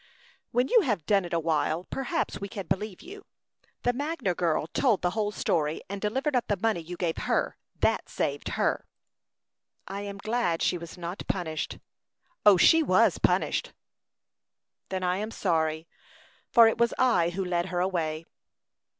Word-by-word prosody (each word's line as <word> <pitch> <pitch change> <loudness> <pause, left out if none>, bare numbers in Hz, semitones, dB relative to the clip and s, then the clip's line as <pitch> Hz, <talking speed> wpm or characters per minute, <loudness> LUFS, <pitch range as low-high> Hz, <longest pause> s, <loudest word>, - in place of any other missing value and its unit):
"When 245 +2 +1
you 470 - +5
have 210 - -1
done 200 -3 +3
it 175 - -8
a 170 - +1
while, 160 +1 0
perhaps 265 -6 -2
we 200 - -3
can 200 -1 -6
believe 195 +2 -3
you. 395 +2 -10 0.6
The 245 - +2
Magner 285 - -2
girl 165 -4 0
told 215 - +1
the 180 - +2
whole 210 0 -1
story, 155 -6 -1
and 200 -1 -5
delivered 265 +7 0
up 245 - +1
the 205 - 0
money 220 -1 0
you 175 +2 -8
gave 170 -2 -1
her; - - 0 0.3
that - - +1
saved - - -2
her." - - 0 1.0
"I 195 +1 -5
am 200 -1 -6
glad 215 -5 0
she 180 - +1
was 170 +1 -9
not 175 +2 -5
punished." 160 -5 -3 0.8
"She 325 - +6
was 310 - +3
punished." - - +1 1.2
"Then 190 -1 -3
I 180 0 +1
am 215 +2 -3
sorry, 160 -6 -1 0.6
for 230 -2 +7
it 225 - 0
was 235 0 +2
I 185 -10 +3
who 190 +2 -3
led 175 0 0
her 180 -1 -2
away." 165 -4 -1
190 Hz, 165 wpm, -28 LUFS, 170-225 Hz, 1.2 s, for